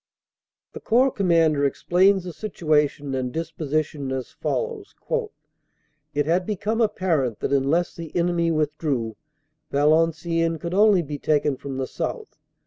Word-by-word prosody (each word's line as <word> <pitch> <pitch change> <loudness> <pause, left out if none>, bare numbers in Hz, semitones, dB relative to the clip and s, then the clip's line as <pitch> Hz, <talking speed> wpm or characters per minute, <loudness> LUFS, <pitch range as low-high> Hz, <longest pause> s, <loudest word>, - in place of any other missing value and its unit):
The - - -7
Corps 255 +4 +3
Commander 165 -7 +2
explains 185 +7 +3
the 180 -2 -7
situation 150 -8 0
and 130 -1 -2
disposi 155 -1 -1
tion 140 -3 -6
as 130 -1 -4
follows: 460 -4 -3 1.2
"It 145 0 +1
had 170 +4 +2
become 215 +2 -1
apparent 160 - 0
that - - -1
unless 140 +6 +1
the 165 -2 -8
enemy 170 -1 +1
withdrew, 150 -7 -1 0.5
Valenciennes 165 +3 +2
could 170 +2 -5
only 200 -2 +5
be 145 -1 -6
taken 145 -1 +1
from 135 0 -7
the 135 - -1
south. 435 - -5
165 Hz, 135 wpm, -24 LUFS, 145-180 Hz, 1.2 s, only